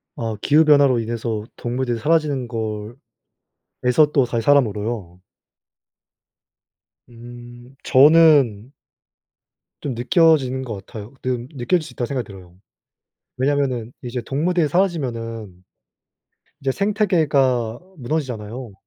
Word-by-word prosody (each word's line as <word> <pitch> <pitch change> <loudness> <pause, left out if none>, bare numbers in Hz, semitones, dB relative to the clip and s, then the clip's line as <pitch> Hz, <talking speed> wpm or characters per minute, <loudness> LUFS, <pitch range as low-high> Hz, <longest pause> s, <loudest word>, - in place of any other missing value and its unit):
아 115 -2 -4
기후 155 +2 +4
변화로 140 -5 +5
인해서 115 -1 -3
동물들이 120 0 -2
사라지는 145 -3 0
걸 110 -1 -5 0.9
에서 135 +5 +3
또다시 120 -4 +1
사람으로요? 105 -8 0 1.9
음 120 +1 -13
저는 140 -6 +5 1.1
좀 135 - -3
느껴지는 130 -1 +2
것 115 -4 -5
같아요. 110 0 -10
느 125 -1 -2
느껴질 155 +6 0
수 - - -11
있다고 120 - -3
생각이 130 -3 -3
들어요. 90 -3 -13 0.8
왜냐하면은 130 -4 -1
이제 125 -2 -5
동물들이 160 +6 0
사라지면은 115 - -2 1.0
이제 135 -1 -1
생태계가 150 - +1 0.2
무너지잖아요. 120 -4 -4
125 Hz, 260 characters per minute, -21 LUFS, 115-145 Hz, 1.9 s, 변화로